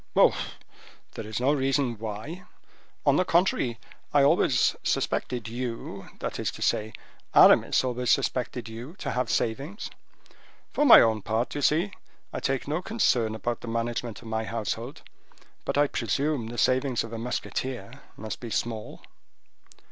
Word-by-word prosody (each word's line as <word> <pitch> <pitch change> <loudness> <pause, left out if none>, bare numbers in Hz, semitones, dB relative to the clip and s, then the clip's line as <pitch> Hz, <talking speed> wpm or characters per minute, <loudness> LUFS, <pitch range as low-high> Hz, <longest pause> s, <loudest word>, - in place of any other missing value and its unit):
"Oh, - - +6 0.8
there - - -7
is 110 0 -3
no 135 +4 +3
reason 135 -4 0
why; 115 - -6 0.6
on - - +5
the 185 - +4
contrary, 170 -10 +2 0.3
I 145 -1 +5
always 140 - +3
suspected 120 -2 -1
you—that 115 -4 -5
is - - 0
to - - -5
say, 110 +1 0 0.4
Aramis - - +6
always 125 -1 -1
suspected 125 -1 0
you 120 +9 -8
to 140 -7 -4
have 125 0 -1
savings. 140 - -2 0.8
For 295 - +2
my - - +11
own 110 -2 +2
part, 115 +4 -1
d'ye 145 - -3
see, 165 +8 +2 0.4
I - - -2
take 135 0 -1
no 155 +4 -1
concern 125 - +1
about 120 +1 -3
the - - -8
management 115 0 -3
of - - -11
my 110 0 -1
household; 115 +3 -4 0.6
but - - -1
I 145 - +5
presume 135 +1 -1
the 120 +1 -7
savings 130 0 +2
of 115 0 -8
a 115 - -4
musketeer 125 +2 -4 0.2
must 110 0 -6
be 120 - -7
small." 110 -1 -3
120 Hz, 150 wpm, -27 LUFS, 115-140 Hz, 0.8 s, my